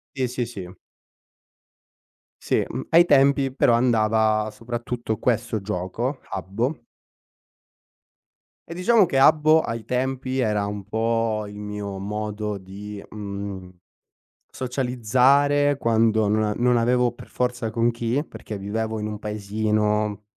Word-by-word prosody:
Sì, 130 -1 0
sì, 125 0 -2
sì. 95 -6 -9 1.6
Sì, - - +1
uhm, - - -5
ai 170 +2 +6
tempi 140 -3 +4
però 120 - +3
andava 110 -2 +2
soprattutto 120 -1 -4
questo 115 -2 0
gioco, 105 +7 -3
Habbo. 115 +8 -3 1.9
E 170 - -5
diciamo 200 +4 +4
che 135 - -1
Habbo, 155 +3 +5
ai 115 -5 -5
tempi 130 +1 -2
era 105 -4 +1
un 100 -1 -5
po' 110 -1 0
il 100 - -10
mio 105 -1 -5
modo 105 0 -3
di, 100 +2 -9
mhmm, 100 -3 -6 0.8
socializzare 130 +3 +2
quando 110 -3 +2
non 105 +1 +2
a 105 -1 0
non 125 0 +3
avevo 120 +1 +2
per 120 - -13
forza 125 -2 -2
con 115 +2 +1
chi, 120 +5 -1
perché 105 - -8
vivevo 110 +3 -3
in 105 - -3
un 105 -1 -5
paesino 105 0 -1
115 Hz, 125 wpm, -23 LUFS, 105-125 Hz, 1.9 s, ai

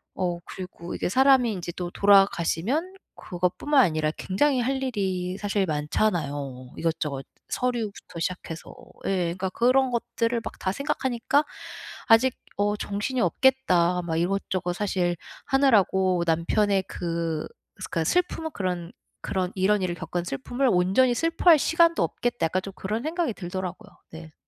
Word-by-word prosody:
어 175 -2 -1
그리고 180 -2 -8
이게 - - -2
사람이 260 0 +4
인제 175 -3 -5
또 180 -1 -3
돌아가시면 200 - +3 0.2
그것뿐만 180 +11 0
아니라 155 -3 +1
굉장히 260 +8 +1
할 265 +2 0
일이 190 -6 -2
사실 200 -1 0
많잖아요, 145 -5 -2
이것저것 150 -4 -2 0.2
서류부터 230 -8 -3
시작해서. 165 -1 -5 0.3
예. 190 -2 +1
그러니까 190 0 -2
그런 255 +5 +3
것들을 235 0 -1
막 - - -6
다 190 - -1
생각하니까 280 +2 0 0.6
'아직 235 +3 +5 0.2
어 205 +1 +1
정신이 205 +6 -2
없겠다. 180 -11 +3
막 165 -1 -2
이것저것 180 0 -1
사실 180 -2 0 0.3
하느라고 190 -9 +3
남편의 190 +4 +2
그 165 -2 -3 0.3
그러니까 185 -3 -3
슬픔은 325 - 0
그런 180 -2 -3 0.3
그런 185 -1 -2
이런 200 +2 +2
일을 175 -1 -1
겪은 175 0 -4
슬픔을 245 - -1
온전히 195 +8 +3
슬퍼할 330 +1 +4
시간도 335 +2 +3
없겠다.' 240 -7 -1
약간 185 +3 0
좀 195 - -7
그런 215 +6 -3
생각이 320 -4 -1
들더라고요. 185 +2 -6 0.2
네. 160 -1 -11
190 Hz, 330 characters per minute, -25 LUFS, 175-245 Hz, 0.6 s, 아직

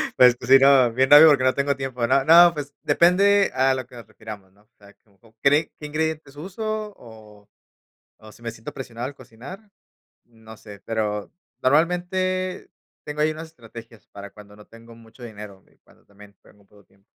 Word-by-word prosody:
Pues 125 -1 +5
sí, 135 +2 +5
no, 135 -3 +4
bien 130 +2 +1
rápido 150 +2 +9
porque 140 -3 +2
no 130 0 +1
tengo 140 0 -1
tiempo, 130 -3 -4
¿no? 135 +2 +1
No, 170 +3 +6
pues 145 -2 -7
depende 200 +3 +3
a 130 +1 +1
lo 130 -2 -6
que 130 - -17
nos 115 -3 -12
refiramos, 110 -3 -13
¿no? 100 - -28
O - - -42
sea, 100 -1 -19
como 110 +2 -27
cree 145 +3 +2
¿qué 150 - -8
ingredientes 155 -1 -4
usó? 215 +5 -6
¿O 110 -3 -17 0.7
o 110 0 -16
si 120 - -20
me 115 - -5
siento 115 0 -11
presionado 120 -2 -7
al 140 - -9
cocinar? 135 - -14 0.6
No 110 -1 -16
sé, 105 -2 -14
pero 105 -2 -4 0.3
normalmente 180 +5 -1 0.3
tengo 150 0 -6
ahí 155 +1 +1
unas 160 +1 -9
estrategias 115 - -15
para 100 0 -12
cuando 105 0 -17
no 105 0 -17
tengo 115 0 -17
mucho 115 +2 -17
dinero 105 -4 -11
y - - -32
cuando - - -27
también 100 0 -19
tengo - - -23
muy 100 - -26
poco 105 0 -23
tiempo. 100 +1 -33
125 Hz, 190 wpm, -22 LUFS, 110-155 Hz, 0.7 s, rápido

